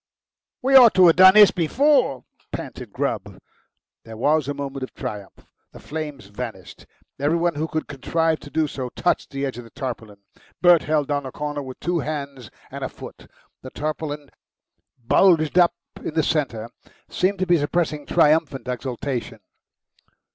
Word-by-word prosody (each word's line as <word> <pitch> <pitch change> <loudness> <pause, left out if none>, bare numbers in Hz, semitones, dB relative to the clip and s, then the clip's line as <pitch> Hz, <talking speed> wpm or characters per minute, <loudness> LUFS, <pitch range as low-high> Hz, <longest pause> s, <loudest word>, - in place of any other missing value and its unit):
"We 270 +1 +3
ought 245 -4 +8
to 185 -1 +7
have 165 - +6
done 185 +1 +8
this 210 -2 +8
before," 250 - +1 0.3
panted - - -7
Grubb. - - -3 0.7
There 110 -1 -10
was 150 +4 +1
a 145 - -2
moment 140 -1 -5
of 130 - -7
triumph. 105 -7 -8 0.3
The - - -12
flames 150 -6 -6
vanished. 100 -2 -9 0.3
Every 145 +4 +1
one 170 0 +1
who 155 +2 -3
could 155 -1 -3
contrive 160 +3 -1
to 145 - -12
do 160 +1 0
so 130 -3 -5
touched 175 - -1
the 140 0 -3
edge 130 -3 -5
of - - -8
the 115 - -15
tarpaulin. 115 -6 -6 0.4
Bert 175 -3 +6
held 150 -2 -1
down 145 -2 -1
a - - -8
corner 150 +1 -4
with 130 -2 -9
two 175 +1 -1
hands 140 -6 -5 0.2
and - - -6
a - - -3
foot. - - -12 0.3
The 130 - -9
tarpaulin, 150 0 -5 0.7
bulged 165 +3 +4
up 175 -1 +4 0.3
in 155 - -5
the 160 - +2
centre, 120 -9 -2 0.4
seemed 195 +2 0
to 185 - -1
be 175 -2 +3
suppressing 150 0 -1
triumphant 155 -5 +2
exultation. 125 -2 -4
150 Hz, 165 wpm, -22 LUFS, 130-165 Hz, 0.7 s, ought